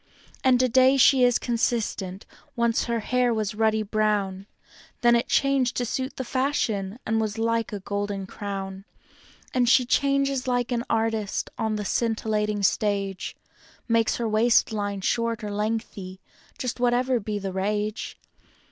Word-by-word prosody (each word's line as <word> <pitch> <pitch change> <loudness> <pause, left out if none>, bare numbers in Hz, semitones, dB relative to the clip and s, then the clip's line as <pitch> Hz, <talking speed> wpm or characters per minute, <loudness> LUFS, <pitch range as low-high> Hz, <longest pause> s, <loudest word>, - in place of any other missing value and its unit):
And 255 -2 +4
today 260 +2 +4
she 260 0 +6
is 245 -1 +4
consistent; 225 -5 -2 0.3
once 235 -1 +1
her 235 -1 -1
hair 250 +2 +1
was 215 -2 -1
ruddy 220 0 +1
brown, 205 -2 -1 0.5
Then 240 0 +5
it 235 - +1
changed 275 -2 +2
to 245 - 0
suit 260 +3 -3
the 260 - -2
fashion, 235 -7 -1
and 225 0 +1
was 215 0 -2
like 230 0 0
a 205 -2 -5
golden 205 0 -3
crown; 195 -1 -6 0.7
And 245 -2 +2
she 255 0 +5
changes 275 0 +1
like 245 -1 0
an 235 -1 -1
artist 225 -2 -1
on 220 -1 0
the 210 -1 -3
scintillating 215 -2 0
stage; 195 -1 0 0.5
Makes 230 -1 +2
her 235 - -2
waist 220 +2 +3
line 205 -2 -3
short 230 +2 -1
or 210 - -4
lengthy— 205 -3 -3 0.4
just 250 -1 -4
whatever 245 +1 +2
be 210 0 -3
the 195 -2 -4
rage. 210 +3 -2
225 Hz, 145 wpm, -25 LUFS, 205-245 Hz, 0.7 s, she